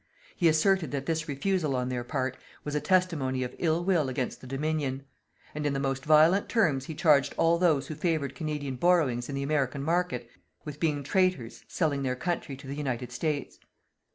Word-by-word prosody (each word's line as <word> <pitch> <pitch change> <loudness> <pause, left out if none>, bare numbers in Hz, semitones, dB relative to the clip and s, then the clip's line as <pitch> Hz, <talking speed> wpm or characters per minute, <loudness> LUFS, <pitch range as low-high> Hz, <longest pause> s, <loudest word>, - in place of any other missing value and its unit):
He 175 - +3
asserted 160 +1 +3
that 140 0 -3
this 160 0 -1
refusal 155 0 0
on 125 0 -1
their 125 -1 -2
part 130 0 -2 0.3
was 145 - -4
a 150 - 0
testimony 150 -7 +1
of 125 - -5
ill 165 0 +1
will 170 -8 +2
against 130 -1 -3
the 130 - -10
Dominion. 140 -1 -2 0.5
And 150 - -4
in 145 -1 0
the 135 - -1
most 135 0 -2
violent 155 +6 +5
terms 155 - +2
he 160 - -6
charged 145 -4 +3
all 165 +1 +3
those 155 -6 +3
who 155 - -6
favoured 155 -3 -1
Canadian 150 -5 -4
borrowings 145 -8 +2
in 140 - -3
the 140 - -2
American 140 -2 0
market 165 -6 0 0.4
with 150 -1 -7
being 150 -3 0
traitors 145 - 0
selling 150 -5 0
their 130 -2 -1
country 145 -2 -3
to 135 - -13
the 135 - -5
United 125 -4 -3
States. 145 +3 -3
145 Hz, 190 wpm, -28 LUFS, 135-165 Hz, 0.5 s, violent